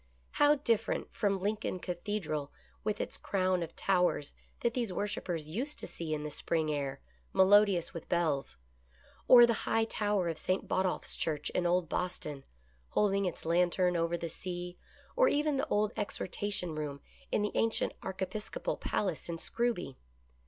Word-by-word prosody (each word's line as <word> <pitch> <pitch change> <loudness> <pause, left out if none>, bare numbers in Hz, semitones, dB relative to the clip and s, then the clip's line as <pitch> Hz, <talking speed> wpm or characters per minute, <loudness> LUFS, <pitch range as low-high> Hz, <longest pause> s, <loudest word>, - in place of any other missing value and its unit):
How 290 0 +5
different 230 -6 0
from 200 -2 +1
Lincoln 205 0 -1
Cathedral 175 -5 -3 0.3
with 215 -1 -1
its - - -3
crown 185 -2 +1
of 165 -1 -5
towers 180 -6 +1 0.3
that 235 - +1
these 235 -5 -1
worshipers 180 -5 -2
used 250 - -2
to - - -5
see 165 -2 -5
in 150 -1 -1
the 150 - -4
spring 155 +1 0
air, 140 -2 -3 0.3
melodi 200 0 +6
ous 170 - -4
with 165 - -8
bells; 150 - 0 0.7
or 240 -1 +10
the 235 - +2 0.2
high 225 0 +3
tower 205 -4 0
of 165 -2 -3
St. 185 +1 -1
Botolph's 185 -1 0
Church 150 -2 -1
in 175 - +1
old 175 0 +2
Boston, 155 -5 -3 0.5
holding 200 -1 +2
its 180 - -3
lantern 180 +2 +3
over 170 0 +1
the 170 - -4
sea, 175 +1 -5 0.4
or - - +5
even 295 - +2
the - - 0
old 210 0 +2
exhortation 200 -3 -2
room 145 -2 -4 0.3
in 210 - +2
the 210 - 0
ancient 225 0 +1
archiepiscopal 190 - -3
palace 180 -5 -2
in 170 - -2
Scrooby 225 - -1
185 Hz, 160 wpm, -32 LUFS, 165-210 Hz, 0.7 s, or